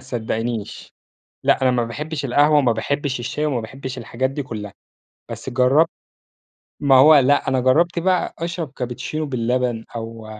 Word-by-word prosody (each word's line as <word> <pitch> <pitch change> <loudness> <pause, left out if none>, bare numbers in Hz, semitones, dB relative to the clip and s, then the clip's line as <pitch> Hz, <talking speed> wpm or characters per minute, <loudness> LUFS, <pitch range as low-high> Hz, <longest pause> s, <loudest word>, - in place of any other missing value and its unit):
تصدقينيش. 115 -2 -4 0.5
لأ، - - +3
أنا 130 -1 +3
ما 120 -1 +1
باحبش 145 +5 -5
القهوة، 145 +4 +4
وما 130 -5 +3
باحبش 140 +3 -2
الشاي، 150 +5 -3
وما 130 -6 -1
باحبش 130 +3 -7
الحاجات 130 +1 -2
دي 140 +1 -4
كلها. 105 -5 -7 0.6
بس - - -6
جرّبت 130 +6 +3 0.9
ما 140 -2 +4
هو 150 +4 +8
لأ، 140 +2 +2
أنا 130 -1 +2
جرّبت 165 +8 +2
بقى 180 0 0
أشرب 170 -3 -4
كابتشينو 130 +5 -4
باللبن، 125 -2 -1
أو 115 -1 -7
130 Hz, 150 wpm, -21 LUFS, 120-145 Hz, 0.9 s, هو